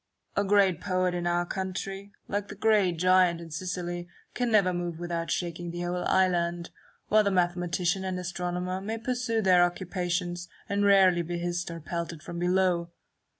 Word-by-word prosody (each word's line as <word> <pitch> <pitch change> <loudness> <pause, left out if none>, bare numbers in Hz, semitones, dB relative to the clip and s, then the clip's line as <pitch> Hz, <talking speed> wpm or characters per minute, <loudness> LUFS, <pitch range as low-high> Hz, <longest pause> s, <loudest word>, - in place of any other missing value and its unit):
A 200 - +2
great 195 -3 +3
poet 185 -2 0
in 175 -1 -2
our 175 0 +1
country, 195 +2 -4 0.2
like 205 0 -2
the 210 - -8
great 205 -3 +3
giant 180 -1 +4
in 165 -1 -10
Sicily, 175 +1 -4 0.3
can 245 -1 0
never 195 -4 +4
move 175 -2 -3
without 170 -1 -3
shaking 175 0 -2
the 175 +1 -5
whole 180 0 -2
island; 175 -2 +1 0.4
while 215 0 +5
the 200 - +2
mathematician 180 0 0
and 185 -1 -2
astronomer 180 +1 -3
may 220 +3 -3
pursue 235 -1 -1
their 180 -2 +6
occupations, 175 -1 -2 0.2
and 200 0 0
rarely 190 -3 +5
be 175 +1 -4
hissed 175 0 -2
or 165 0 -6
pelted 170 0 -5
from 170 - -6
below. 180 -1 +1
180 Hz, 165 wpm, -28 LUFS, 175-190 Hz, 0.4 s, their